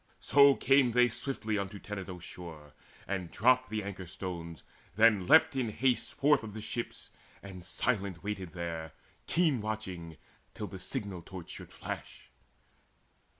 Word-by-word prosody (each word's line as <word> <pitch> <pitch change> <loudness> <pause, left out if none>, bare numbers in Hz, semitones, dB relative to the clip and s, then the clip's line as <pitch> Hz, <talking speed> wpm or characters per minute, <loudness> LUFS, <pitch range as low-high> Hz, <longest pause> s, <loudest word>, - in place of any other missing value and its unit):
So 140 -1 +6
came 135 -3 +4
they 125 0 +5
swiftly 110 -3 -2
unto 100 +1 -4
Tenedos' 95 -3 -7
shore, 80 -6 -9 0.3
And 95 -3 -2
dropped 130 +6 +3
the 110 -1 -2
anchor 95 -2 -6
stones, 85 -2 -6 0.3
then 105 -4 +5
leapt 160 +2 +6
in 125 -4 0
haste 125 +3 0
Forth 145 0 +4
of 110 -2 -8
the - - -4
ships, 115 +2 -5 0.3
and 95 -3 -9
silent 95 -2 -1
waited 95 -4 -4
there 85 -3 -4 0.3
Keen 160 -9 +2
watching 95 -7 -5 0.4
till - - -4
the - - -8
signal 95 -4 -4
torch 90 0 -9
should - - -9
flash. - - -7
100 Hz, 145 wpm, -31 LUFS, 90-120 Hz, 0.4 s, So